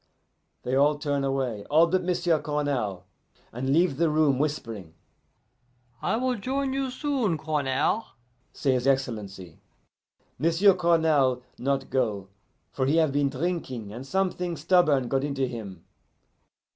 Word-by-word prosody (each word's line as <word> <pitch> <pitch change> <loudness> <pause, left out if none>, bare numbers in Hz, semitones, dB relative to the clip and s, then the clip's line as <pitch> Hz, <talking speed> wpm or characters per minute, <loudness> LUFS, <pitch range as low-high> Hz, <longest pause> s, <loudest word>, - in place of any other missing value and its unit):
They 125 - -3
all 145 +2 +3
turn 145 -2 -1
away, 130 -6 -2
all 160 +3 +5
but 185 +2 +1
M'sieu' 175 -2 +1
Cournal, 140 - -2 0.5
and 130 +3 -3
leave 160 0 +3
the 165 0 +2
room, 150 -4 +2
whispering. 115 - -3 1.1
'I - - 0
will 255 +1 0
join 265 +4 -2
you 270 -1 -1
soon, 255 - -1
Cournal,' 150 +7 0 0.5
say 135 - 0
his 130 0 0
Excellency. 105 -10 -2 0.8
M'sieu' 170 +6 +4
Cournal 160 -8 +2 0.2
not 135 +1 -1
go, 105 -7 -1 0.4
for 130 -1 -1
he 145 - +2
have 160 -3 +3
been 140 0 +1
drinking, 130 - -4
and 125 +4 -8
something 180 -1 -1
stubborn 155 -5 +3
got 135 +2 0
into 140 -2 -1
him. 105 -8 -7
145 Hz, 130 wpm, -26 LUFS, 130-170 Hz, 1.1 s, all